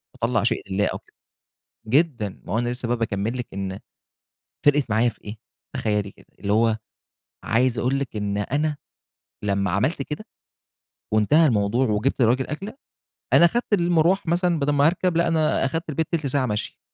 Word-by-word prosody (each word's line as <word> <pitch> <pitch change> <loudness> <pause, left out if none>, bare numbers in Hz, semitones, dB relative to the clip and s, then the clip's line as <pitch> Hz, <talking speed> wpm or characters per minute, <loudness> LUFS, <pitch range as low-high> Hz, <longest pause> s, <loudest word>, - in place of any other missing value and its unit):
أطلَّع 125 0 0
شيء 115 - +1
لله 105 +1 +2
أو - - -3
كده، - - -31 0.7
جدًا، 125 - +1
ما - - -5
هو 110 - +1
أنا 120 0 0
لسه 120 -1 -4
بقى 120 - +1
باكمِّل 115 +1 -2
لِك 125 - -4
إن 95 -1 -4 0.9
فرقت 145 -4 +3
معايا 110 +3 +3
في - - -9
إيه؟ 105 +2 -7 0.4
تخيَلي 105 -2 -1
كده، - - -21
اللي 100 0 -2
هو 110 0 +3 0.7
عايز 120 +1 +1
أقول 130 +2 +1
لِك 135 -5 -4
إن 100 -1 -2
أنا 145 +8 -1 0.7
لمّا 100 -1 0
عملت 135 - 0
كده، 150 +9 -6 0.9
وانتهى 145 +10 +4
الموضوع، 115 +1 +2
وجِبت 110 +7 0
للراجل 125 +3 +3
أكلة، 195 +9 -6 0.6
أنا 170 - +8
خدت 235 +3 -2
المرواح 175 0 +3
مثلًا 175 0 +1
بَدَل 145 +1 +1
ما 140 0 +3
هاركب، 175 0 +1
لأ، 170 - +3
أنا 155 -4 +2
أخدت 165 +5 -3
البيت 155 +1 -1
تِلت 160 -5 0
ساعة 135 -1 +1
مشي. 105 -2 -3
125 Hz, 175 wpm, -23 LUFS, 110-155 Hz, 0.9 s, أنا